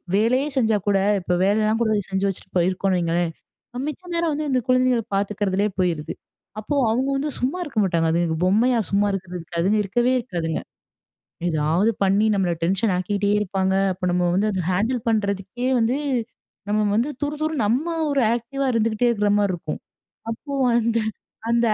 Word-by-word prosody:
வேலையே 255 +7 +2
செஞ்சா 220 -4 +3
கூட, 195 -1 +3 0.2
இப்போ 180 0 -1
வேலையெல்லாம் 215 +2 +2
கூட 220 -1 +1 0.2
செஞ்சு 190 +1 0
வச்சுட்டு 190 0 -8
போயிருக்கோம்னு 185 +1 +1
வையுங்களேன். 170 0 0 0.6
மிச்ச 305 +4 -5
நேரம் 335 -2 +1
வந்து 305 +1 -2
இந்த 255 -1 +2
குழந்தைகள 255 -2 +3
பாத்துக்கிறதிலயே 205 0 0
போயிருது. 170 -4 0 0.5
அப்போ 220 +7 -3 0.2
அவுங்க 260 +4 0
வந்து 295 +2 -1
சும்மா 265 +8 -1
இருக்க 275 -9 -3
மாட்டாங்க. 170 -3 +1
அது 170 - +2 0.2
பொம்மையா 235 +6 +3
சும்மா 205 +1 +3
இருக்கிறதுக்கு, 180 -3 -6
அதுங்க 200 +5 +2
இருக்கவே 240 +6 +1
இருக்காதுங்க. 170 -9 -3 0.9
ஏதாவது 160 +7 +2
பண்ணி, 200 +3 +3
நம்மள 185 -3 +1
டென்ஷன் 195 +3 +1
ஆக்கிட்டே 200 +2 0
இருப்பாங்க. 190 -1 0 0.2
அப்போ 185 0 -7
நம்ம 180 0 +1
வந்து 210 +3 +2
அதை 185 -2 -1
ஹேண்டில் 225 +7 0
பண்றதுக்கே 205 +3 -1
வந்து, 235 +5 +1 0.7
நம்ம 215 0 +2
வந்து 250 +6 +1
துரு 295 +1 -1
துருன்னு, 310 -8 0
நம்ம 255 +10 +1 0.2
ஒரு 275 -3 +2
ஆக்டிவா 270 +4 -3
இருந்துகிட்டே 230 +1 +2
இருக்கிற 210 -2 +1
மாரி 200 -2 +2
இருக்கும். 160 -3 -5 0.5
அப்போ 280 +5 -7 0.2
வந்து 230 -1 +2 0.5
அந்த 235 0 +3
210 Hz, 155 wpm, -23 LUFS, 185-240 Hz, 0.9 s, செஞ்சா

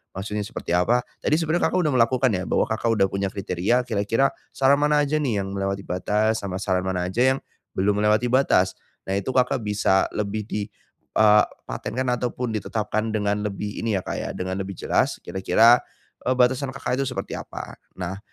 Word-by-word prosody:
maksudnya 105 +2 -3
seperti 105 -5 -3
apa 115 +8 +3 0.2
tadi - - +3
sebenarnya 165 +1 +1
Kakak - - +1
sudah 155 -5 +1
melakukan 125 +2 +3
ya 90 - -2
bahwa - - +2
Kakak 110 +1 -1
udah 95 - +5
punya 100 0 -2
kriteria 100 +6 0
kira-kira 115 +5 +1 0.2
saran 135 +1 +4
mana 150 0 +3
aja 145 +2 -1
nih 130 -9 0
yang 95 0 -6
melewati 100 0 -2
batas 105 +4 0
sama 95 -1 -3
saran 95 -2 0
mana 90 -1 -1
aja 125 +8 +2
yang, - - -6 0.3
belum 100 +2 +1
melewati 105 +3 +3
batas. 120 -7 +3 0.3
Nah 95 - 0
itu 100 +6 -2
Kakak 125 -2 +1
bisa 105 -2 +2
lebih 105 0 -2
di, 105 -1 -3 0.5
eee, 105 -1 +6 0.2
patenkan 130 +2 -3
ataupun 125 0 -2
ditetapkan 110 +1 -2
dengan 105 -1 0
lebih 105 +1 -5
ini 115 -2 0
ya, 95 - -4
Kak, - - -4
ya - - -4
dengan 95 +1 -3
lebih 95 0 -5
jelas - - +1
kira-kira, 110 +6 +4 0.5
eee, 130 - +3
batasan 130 +2 +2
Kakak 130 -1 -2
itu - - 0
seperti 125 - -4
apa. - - -8 0.2
Nah, 95 +1 -5
105 Hz, 185 wpm, -24 LUFS, 95-125 Hz, 0.5 s, eee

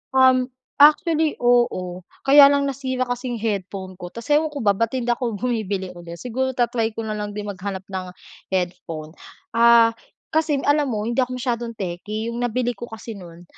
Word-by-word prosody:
Um, 260 -1 +5 0.3
actually 310 +1 +5
oo. 185 -8 +1 0.2
Kaya 280 +1 +9
lang 280 0 +2
nasira 260 -1 -2
kasi 245 +1 -3
yung 230 - -5
headphone 195 -3 -3
ko. 175 - -6
Tapos 235 +5 -9
ewan 305 +2 +4
ko 285 - -4
ba 205 - +5
ba't 230 +4 -1
hindi 245 -2 -2
ako 240 -2 -1
bumibili 205 -4 -2
ulit 175 -1 -9
siguro 260 +2 -2
ta-try 235 -2 0
ko - - -3
na 215 -1 -3
lang 210 0 -4
din 210 0 -4
mag-hanap 190 0 -5
ng 185 -1 -4 0.5
headphone. 175 -4 -3 0.4
Ah, 230 0 +6 0.4
kasing 310 -3 +1
alam 290 -1 +3
mo 210 -2 -2
hindi 235 +3 -1
ako 255 0 0
masyadong 240 -2 -2
techy. 210 +4 -4
Yung 235 - -5
nabili 245 0 0
ko 240 - -7
kasi 225 -1 -8
nun 175 -2 -12
230 Hz, 180 wpm, -22 LUFS, 200-255 Hz, 0.5 s, Kaya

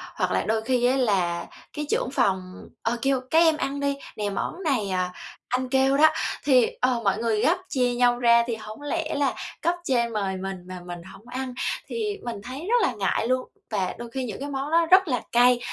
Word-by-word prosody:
hoặc - - 0
là - - +2
đôi 220 0 0
khi 245 +1 +1
á 255 +2 +3
là 190 -9 +1 0.3
cái 300 0 -3
trưởng 250 - 0
phòng, 185 -7 -1
ờ, 230 +1 0
kêu: 270 0 +2
"Các 320 - +5
em 325 -2 +5
ăn 280 -1 -2
đi, 280 0 0 0.2
nè 210 -1 -1
món 270 - -4
này, 255 - 0
à, 185 -1 -1 0.4
anh 255 +1 -1
kêu 270 +1 +3
đó," 310 +2 +7 0.3
thì 255 -5 +5
ờ, 250 -2 +2
mọi 195 -1 +2
người 225 -2 0
gắp, 345 +4 +3
chia 250 -3 +1
nhau 245 0 +3
ra 235 -1 +5
thì 235 - -1
hổng 215 +2 -9
lẽ 315 +2 -2
là 280 -3 +1 0.3
cấp 340 +2 +1
trên 235 -6 +1
mời 195 -3 -1
mình 190 0 -4
mà 185 0 -7
mình 175 -1 -7
hổng 190 +5 -14
ăn, 255 +1 -4 0.3
thì 420 -3 -2
mình 235 -4 -5
thấy 255 +5 -6
rất 485 0 +4
là 400 - +2
ngại 205 +2 0
luôn. 255 0 0 0.2
Và 195 -4 -1
đôi 240 0 -7
khi 265 +1 -3
những 215 -5 -6
cái 285 +1 -4
món 275 +1 -3
đó 335 +1 +4
rất 380 0 +7
là 250 -6 0
cay, 245 +1 +5
245 Hz, 225 wpm, -25 LUFS, 215-280 Hz, 0.4 s, đó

